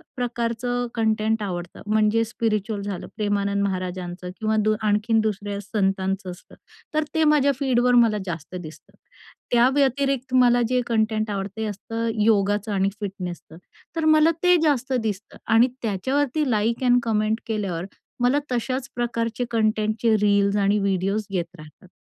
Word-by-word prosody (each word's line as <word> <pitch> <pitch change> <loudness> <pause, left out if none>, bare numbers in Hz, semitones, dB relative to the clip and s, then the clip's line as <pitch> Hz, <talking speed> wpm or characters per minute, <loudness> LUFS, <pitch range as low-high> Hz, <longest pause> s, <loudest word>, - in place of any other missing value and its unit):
प्रकारचं 245 0 -2
कंटेंट 220 -1 +1
आवडतं 175 -3 -5
म्हणजे 215 +1 +3
स्पिरिच्युअल 215 -2 -2
झालं, 200 -2 -5
प्रेमानंद 200 -1 0
महाराजांचं 185 -1 -4
किंवा 220 0 0
दो 215 0 +3
आणखीन 215 +2 +2
दुसऱ्या 205 -1 -3
संतांचं 195 -2 -1
असतं, 180 - -14 0.4
तर 310 0 +2
ते 320 - +3
माझ्या 295 -2 +4
फीडवर 250 -2 +2
मला 215 -2 +1
जास्त 170 0 -6
दिसतं. 160 -3 -10 0.6
त्या 240 +1 +5
व्यतिरिक्त 275 -2 +1
मला 245 -1 +5
जे 250 0 +2
कंटेंट 220 -1 0
आवडतं 195 0 -4
ते 220 - -2
असतं 225 +3 -3 0.2
योगाचं 205 -1 +2
आणि 195 0 +2
फिटनेसचं. 180 -5 -6 0.4
तर 320 -1 -1
मला 310 +1 +5
ते 360 0 +6
जास्त 270 -3 +1
दिसतं 210 -2 -4 0.2
आणि 230 +3 +6
त्याच्यावरती 265 +7 0
लाइक 225 +3 0
अ‍ॅन्ड 245 -1 +5
कमेंट 220 0 0
केल्यावर 195 -6 -2 0.4
मला 260 +4 +3
तशाच 255 +2 -2
प्रकारचे 240 0 -2
कंटेंटचे 220 0 +1
रील्स 200 -1 +3
आणि 200 +1 +2
व्हिडिओज 195 +2 0
येत 175 -3 -1
राहतात. 155 +5 -15
215 Hz, 140 wpm, -23 LUFS, 200-245 Hz, 0.6 s, ते